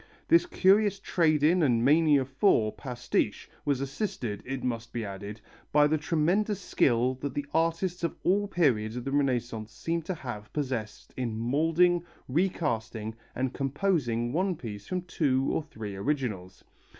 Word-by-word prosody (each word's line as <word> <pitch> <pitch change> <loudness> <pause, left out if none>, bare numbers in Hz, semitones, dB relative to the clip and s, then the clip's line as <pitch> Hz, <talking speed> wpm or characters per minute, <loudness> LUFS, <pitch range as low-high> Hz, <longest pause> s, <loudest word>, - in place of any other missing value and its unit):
This 335 +1 +5
curious 200 - +4
trade 155 -6 +2
in 170 +4 +4
and 120 -6 +3
mania 145 -2 +5
for 130 - +2
pastiche 125 -1 -2 0.2
was 140 -2 +1
assisted, 135 - -3
it 135 -1 -4
must 115 -2 -3
be 115 -2 -3
added, 100 +2 -7 0.3
by 150 0 +5
the 155 +1 +2
tremendous 180 +7 +1
skill 125 - +2
that 140 -2 -4
the 145 - -2
artists 165 +2 0
of 170 - -1
all 200 +3 +2
periods 120 - +1
of 125 - -4
the 135 - -2
Renaissance 120 -6 -1
seem 165 +9 -2
to 175 +3 -4
have 120 -9 -7
possessed 130 -7 -4
in 120 -4 -2
moulding, 165 +8 +2 0.2
recasting, 125 - -1 0.2
and 130 0 -1
composing 135 -5 0
one 185 +2 +1
piece 105 -7 -8
from 180 -1 -2
two 140 -7 +1
or - - 0
three 110 -10 -7
originals. 100 -6 -3
140 Hz, 150 wpm, -28 LUFS, 115-165 Hz, 0.3 s, This